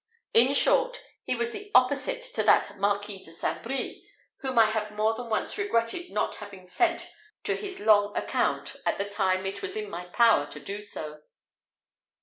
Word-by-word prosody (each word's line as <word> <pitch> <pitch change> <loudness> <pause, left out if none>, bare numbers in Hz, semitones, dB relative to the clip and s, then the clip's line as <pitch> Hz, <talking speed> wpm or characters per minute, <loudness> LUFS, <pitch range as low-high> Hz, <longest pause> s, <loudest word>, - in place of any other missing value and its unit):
In 250 +5 +6
short, - - +3 0.3
he - - 0
was 235 0 -1
the 410 +7 -8
opposite 285 - +3
to - - +1
that 200 - +3
Marquis 200 0 -1
de 165 - -10
St. 165 - -3
Brie 265 +3 -5 0.3
whom 260 -2 -3
I 225 - +8
had 215 -1 -2
more 215 +1 +2
than 235 +1 -7
once 225 - -1
regretted 345 - -1
not - - -1
having 200 -3 -10
sent 335 - 0 0.3
to - - +1
his 390 -3 -6
long 205 -1 +3
account - - -1
at - - 0
the 200 - -2
time 190 -2 0
it 195 - -4
was 390 0 -3
in 425 -1 -5
my 180 - -6
power 220 -4 +4
to - - -9
do 205 +1 -5
so. 155 -7 -7
220 Hz, 180 wpm, -27 LUFS, 200-270 Hz, 0.3 s, I